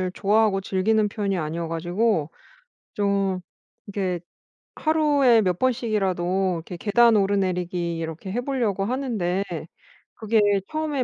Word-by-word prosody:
좋아하고 205 -1 +2
즐기는 210 +3 +1
편이 200 -2 -2
아니어 165 +1 -3
가지고 175 0 0 0.6
좀 200 -2 0 0.5
이렇게 190 -4 -2 0.6
하루에 290 -7 +3
몇 180 -3 0
번씩이라도 195 -7 0
이렇게 175 - -7
계단 230 +4 +4
오르내리기 180 -4 0
이렇게 165 +3 -5
해 245 - -1
보려고 235 -8 -1
하는데 215 -8 -1 0.7
그게 220 0 +1 0.3
처음에 310 -4 -1
200 Hz, 290 characters per minute, -24 LUFS, 180-230 Hz, 0.7 s, 계단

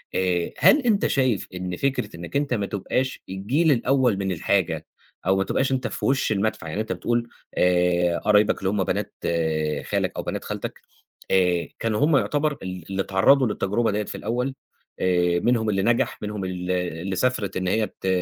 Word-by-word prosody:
آآ، 90 -2 0
هل 295 - +6
أنت 225 -6 +2
شايف 130 -7 +1
إن 90 -1 -4
فكرة 140 0 -1
إنَّك 85 +9 -9
أنت 140 -2 +1
ما 105 -4 0
تبقاش 130 +7 -2
الجيل 125 - +1
الأول 125 -3 +2
من 95 -1 -1
الحاجة 80 -3 0 0.4
أو 95 - +4
ما 95 - +2
تبقاش 135 +7 0
أنت 130 -1 0
في - - -5
وش 135 -4 +1
المدفع، 105 -4 -1
يعني 80 +7 -2
أنت 110 - -5
بتقول 120 +6 -1 0.3
آآ، 90 -1 +3
قرايبك 105 0 +3
اللي 95 - 0
هُم 100 -2 +1
بنات - - -2
آآ، 80 -3 0
خالك - - -1
أو - - -2
بنات - - -4
خالتك - - -5 0.5
آآ، 90 -2 +2
كانوا 110 -2 0
هُم 150 -2 +4
يعتبر 150 +1 0
ال 90 -2 -6
اللي 95 0 -1
اتعرضوا 115 +8 +4
للتجربة 105 +2 0
دي 105 +1 -1
في - - -7
الأول 125 +5 -2 0.4
آآ، 90 -1 +2
منهم 115 +1 +1
اللي 95 -1 +1
نجح 120 +1 +1
منهم 105 -2 -4
ال 90 0 -3
اللي 90 +1 -2
سافرت 105 -2 0
إن 95 - -2
هي 105 +2 +1
ت 95 - -3
100 Hz, 185 wpm, -24 LUFS, 90-120 Hz, 0.5 s, هل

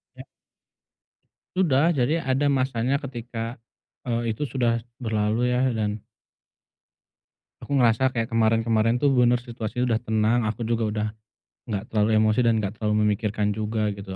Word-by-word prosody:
Ya. - - -10 1.4
Udah, 165 -1 +3
jadi 140 +3 +1
ada 135 +2 +2
masanya 130 0 0
ketika, 120 -3 -7 0.7
eee, 115 -1 0
itu 110 - -11
sudah 120 -3 0 0.2
berlalu 110 +1 0
ya, 125 - +1 0.2
dan 105 -1 -2 1.6
aku - - -10
ngerasa, 125 +1 +3
kayak 115 -3 -3
kemarin-kemarin 115 0 +2
tuh, 140 +1 +2
benar, 125 -1 +4
situasinya 120 0 -3
udah 110 - +1
tenang, 110 +1 +1
aku 110 +2 -4
juga 115 0 0
udah, 105 0 -2 0.6
nggak 100 -2 -2
terlalu 105 0 +2
emosi 110 +1 +3
dan 115 -2 +3
nggak 100 -2 -2
terlalu 105 -1 0
memikirkan 105 0 0
juga, 110 0 -1
gitu. 100 -1 -8
115 Hz, 140 wpm, -24 LUFS, 110-125 Hz, 1.6 s, benar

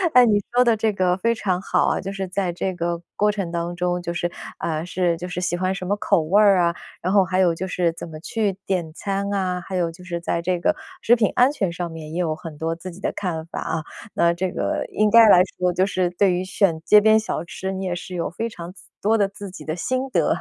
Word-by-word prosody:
诶， 250 -1 +9
你 210 -3 +3
说 245 +1 +4
的 235 -2 +3
这 220 0 +1
个 185 -2 +2
非 230 +4 +1
常 185 -5 -1
好 - - +1
啊， - - +1
就 195 - -5
是 195 -1 -4
在 185 0 -1
这 180 +2 -2
个 170 -1 -2
过 210 0 +3
程 195 -5 -4
当 170 0 -3
中， 180 0 -1
就 170 0 -4
是， 175 0 -1 0.3
啊， 155 -1 -2
是 180 -1 0
就 175 +2 -6
是 180 - -4
喜 180 -1 -1
欢 185 +1 0
什 185 - -5
么 200 - +1
口 200 -3 +2
味 185 +7 +3
儿 200 -2 +6
啊， 170 -1 +2 0.3
然 185 +3 -1
后 200 -2 +6
还 185 0 -2
有 180 -3 +4
就 185 +3 -4
是 175 -2 0
怎 170 - -8
么 155 -1 -9
去 205 +4 -1
点 175 -4 -1
餐 200 +3 -3
啊， 185 -2 -1
还 190 - -5
有 175 -2 0
就 175 +2 -14
是 175 -2 -4
在 170 0 -2
这 180 +1 -1
个 - - +2 0.3
食 240 - +5
品 225 -4 +1
安 250 +2 +5
全 200 -12 -1
上 175 0 -4
面 160 -1 -8
也 170 - -3
有 160 -3 0
很 155 -1 -9
多 165 +2 -2
自 170 +2 -8
己 175 - -12
的 - - -2
看 165 -5 -3
法 170 - -6
啊， 160 - -2 0.3
那 170 0 +3
这 180 +1 -2
个 - - -1
应 215 0 +2
该 225 0 +8
来 180 - +8 0.2
说 180 0 +1
就 185 +2 +2
是 185 -2 0
对 180 +1 +2
于 180 +1 -1
选 185 -3 +1
街 210 - +8
边 220 +1 +5
小 215 -5 -2
吃， 190 +2 -5
你 190 0 -4
也 180 -1 -1
是 175 +1 -8
有 170 -2 -2
非 225 +7 -4
常 175 -4 -9
自 195 - -16 0.2
多 220 +2 +3
的 200 -2 +2
自 200 0 -9
己 185 - -10
的 155 - -3
心 255 +10 -2
得。 - - +2
185 Hz, 290 characters per minute, -22 LUFS, 170-200 Hz, 0.3 s, 诶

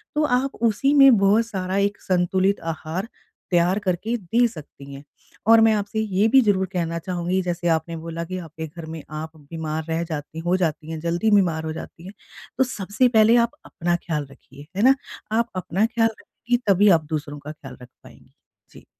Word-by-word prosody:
तो 300 - +2
आप 270 +2 -3
उसी 275 +7 +1
में 275 -4 +7
बहुत 200 +3 +3
सारा 190 -3 -3
एक 200 +1 0
संतुलित 185 +2 +1
आहार 165 +6 -5 0.4
तैयार 175 +3 +3
करके 205 +4 -1
दे 230 +5 +2
सकती 145 -7 -11
हैं, 140 +1 -10 0.4
और 225 0 +7
मैं 220 0 +5
आपसे 210 +1 -2
ये 205 -1 +1
भी 265 +4 +6
ज़रूर 200 -4 +2
कहना 170 -1 -2
चाहूँगी, 180 +1 -2
जैसे 175 -1 -3
आपने 165 +1 -5
बोला 165 +1 -5
कि 185 +2 -5
आपके 160 -2 -7
घर 165 +1 -10
में 160 - -8 0.2
आप 160 0 -8
बीमार 155 +1 -5
रह 165 +1 0
जाती 160 -1 -6
हो 180 - +3
जाती 160 -3 -2
हैं, 160 - -4
जल्दी 170 +6 0
बीमार 175 -6 +3
हो 155 - -3
जाती 165 +1 -10
हैं, 195 - -9 0.4
तो 265 - +4
सबसे 215 0 0
पहले 225 -1 +5
आप 235 - -11
अपना 175 +1 -1
ख़्याल 150 -4 -2
रखिए। 140 +1 -15
है - - +1
ना? 265 +2 +6 0.4
आप 230 +2 +1
अपना 185 +3 0
ख्याल 230 -1 +2
रखेंगी, 245 +1 -2
तभी 200 +1 +5
आप 155 - -17
दूसरों 145 -1 -4
का 145 +1 -8
ख्याल 155 - -12
रख 125 - -11 0.2
पाएँगी। - - -18 0.4
जी। - - -16
185 Hz, 195 wpm, -23 LUFS, 160-215 Hz, 0.4 s, में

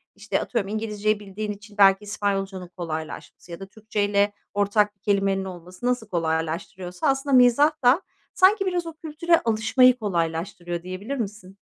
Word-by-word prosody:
işte - - -2
atıyorum 230 -5 -2
İngilizce'yi 215 -1 -1
bildiğin 210 +1 -5
için 205 +1 -12
belki 195 0 +6
İspanyolca'nın 195 -3 -3
kolaylaşması 160 0 -7
ya 170 - -7
da 195 - -7
Türkçeyle 205 -1 0 0.2
ortak 205 +1 +1
bir 195 - -47
kelimenin 195 -1 +1
olması 180 +3 -9
nasıl 245 -3 0
kolaylaştırıyorsa 170 - -2
aslında 270 0 +2
mizah 250 +4 +6
da 255 +8 +5 0.3
sanki 390 +2 +4
biraz 360 -2 -1
o 330 - -6
kültüre 325 +2 +1
alışmayı 240 +1 +3
kolaylaştırıyor 175 -3 -3
diyebilir 185 +9 -5
misin? 200 -4 -6
205 Hz, 145 wpm, -24 LUFS, 185-240 Hz, 0.3 s, belki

